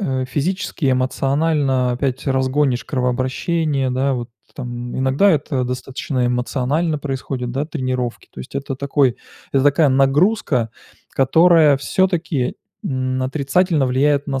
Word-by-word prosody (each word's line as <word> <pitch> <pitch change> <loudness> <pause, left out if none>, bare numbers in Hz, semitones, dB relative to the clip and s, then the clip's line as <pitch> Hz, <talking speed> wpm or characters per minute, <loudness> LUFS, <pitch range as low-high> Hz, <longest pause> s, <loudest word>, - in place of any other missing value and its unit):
э, 130 -8 -1
физически, 155 +1 -1
эмоционально 135 0 +1
опять 130 +1 -2
разгонишь 130 -1 +1
кровообращение, 130 +3 -1
да, 135 +2 0
вот 120 -2 -5 0.2
там. 120 0 -6
Иногда 135 +10 +3
это 140 -4 0
достаточно 125 +1 -3
эмоционально 130 +6 -1
происходит, 130 -3 -4
да, 140 +4 -2
тренировки. 130 -6 -3
То - - -9
есть 65 - -11
это 140 -1 -4
такой 140 -2 +1 0.4
это 135 -1 +3
такая 145 +1 +4
нагрузка, 135 - +2 0.4
которая 160 +2 +5
всё-таки 170 -4 0 0.3
н 130 -1 -1
отрицательно 145 +3 +1
влияет 140 +3 +1
на 135 -2 -2
135 Hz, 120 wpm, -19 LUFS, 130-150 Hz, 0.4 s, которая